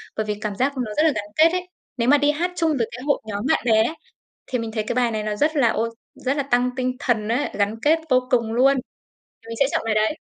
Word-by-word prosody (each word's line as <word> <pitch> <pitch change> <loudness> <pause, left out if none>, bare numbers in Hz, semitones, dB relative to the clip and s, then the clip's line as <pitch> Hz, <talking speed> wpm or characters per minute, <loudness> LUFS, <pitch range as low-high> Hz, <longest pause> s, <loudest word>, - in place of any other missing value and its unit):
bởi 215 - -2
vì 210 -1 -2
cảm 210 -2 -3
giác 270 +4 0
nó 220 -4 -3
rất 305 - +4
là 320 - +4
gắn 205 -1 -3
kết 320 +2 +6
ấy. 360 0 -3 0.3
Nếu 235 0 0
mà 290 - +7
đi 290 +1 +3
hát 345 +4 -2
chung 330 -2 +1
với 230 - 0
cái 250 - -8
hội 285 0 +1
nhóm 205 +2 -4
bạn - - +2
bè 220 -2 +4
ấy, 315 +8 -2 0.5
thì 255 - -2
mình 230 -1 -4
thấy 215 -2 -2
cái - - -2
bài 245 -1 +2
này 215 -1 -2
nó 210 -1 -3
rất 310 +6 +1
là 265 -5 +4
ô 225 +1 0 0.3
rất 265 +3 -2
là 285 - +1
tăng 250 -2 +1
tinh 255 -1 -1
thần 225 -6 0
á, 245 +5 0
gắn 205 +2 0
kết 315 +2 +4
vô 255 0 +2
cùng 230 -3 +1
luôn, 270 +4 +4 0.7
thì 225 - -16
mình 230 - -5
sẽ 275 - +6
chọn - - 0
bài 225 - 0
đấy, 215 +8 +1
250 Hz, 285 wpm, -22 LUFS, 220-285 Hz, 0.7 s, mà